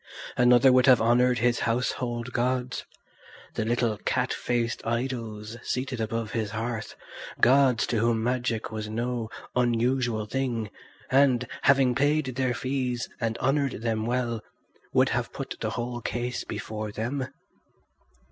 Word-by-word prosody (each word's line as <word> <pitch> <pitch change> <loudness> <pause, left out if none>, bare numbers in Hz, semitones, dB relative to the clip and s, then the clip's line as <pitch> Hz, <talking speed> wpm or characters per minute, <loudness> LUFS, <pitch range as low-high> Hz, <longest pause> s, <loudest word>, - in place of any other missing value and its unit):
Another 125 +1 +6
would 125 +1 +5
have 130 -2 +7
honoured 120 +2 +3
his 120 0 +2
household 120 0 -1
gods, 125 0 -1 0.7
the - - -1
little 115 -2 0
cat - - 0
faced 120 -1 -1
idols 115 -2 -3
seated 130 -2 -2
above 110 0 -2
his 110 -2 -1
hearth, 110 0 -4 0.4
gods 130 -2 +5
to 115 - 0
whom 115 0 +2
magic 120 -2 -1
was 110 -1 -4
no 120 0 -2 0.3
unusual 120 -2 +1
thing, 115 -3 -2 0.4
and, 130 -2 +4 0.2
having 135 -2 +4
paid 145 +3 +2
their 130 -1 0
fees 130 -2 -2
and 115 -2 -1
honoured 135 -3 0
them 110 -1 0
well, 120 -2 -1 0.5
would - - +4
have - - -1
put - - -5
the - - 0
whole 120 0 -3
case 120 +1 -3
before 110 -1 -5
them. 130 +5 -3
120 Hz, 135 wpm, -27 LUFS, 115-125 Hz, 0.7 s, have